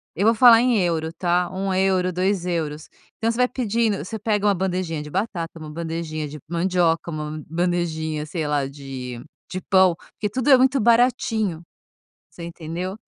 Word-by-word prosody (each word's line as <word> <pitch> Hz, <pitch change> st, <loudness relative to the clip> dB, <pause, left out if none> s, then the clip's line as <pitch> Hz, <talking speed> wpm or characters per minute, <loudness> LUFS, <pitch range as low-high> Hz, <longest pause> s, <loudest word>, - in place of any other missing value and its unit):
eu 195 Hz, -, 0 dB
vou 225 Hz, -, +6 dB
falar 235 Hz, -1 st, +8 dB
em 245 Hz, -2 st, +3 dB
euro 160 Hz, -2 st, -1 dB
tá? 175 Hz, 0 st, 0 dB
1 190 Hz, +1 st, -2 dB
euro, 185 Hz, -1 st, +2 dB
2 185 Hz, 0 st, 0 dB
euros. 155 Hz, -3 st, -3 dB, 0.3 s
Então 225 Hz, -, 0 dB
você 230 Hz, -, -5 dB
vai 250 Hz, 0 st, +4 dB
pedindo 230 Hz, -4 st, 0 dB
você 220 Hz, +4 st, -5 dB
pega 210 Hz, -1 st, 0 dB
uma 200 Hz, -, +3 dB
bandejinha 180 Hz, -4 st, -2 dB
de 150 Hz, -, -9 dB
batata, 170 Hz, -3 st, -3 dB
uma 155 Hz, -, -8 dB
bandejinha 160 Hz, -1 st, -4 dB
de 150 Hz, +1 st, -9 dB
mandioca, 170 Hz, -1 st, +1 dB
uma 155 Hz, 0 st, -5 dB
bandejinha, 165 Hz, -3 st, -1 dB
sei 155 Hz, 0 st, -3 dB
lá, 145 Hz, -2 st, 0 dB
de 130 Hz, -3 st, -8 dB, 0.3 s
de 185 Hz, -, -3 dB
pão, 185 Hz, -3 st, +4 dB, 0.2 s
porque 210 Hz, -, -3 dB
tudo 255 Hz, +6 st, -1 dB
é 265 Hz, -, +9 dB
muito 260 Hz, +2 st, +3 dB
baratinho. 225 Hz, -6 st, +2 dB, 0.7 s
Você 170 Hz, -, -11 dB
entendeu? 170 Hz, +3 st, -5 dB
175 Hz, 175 wpm, -23 LUFS, 160-205 Hz, 0.7 s, é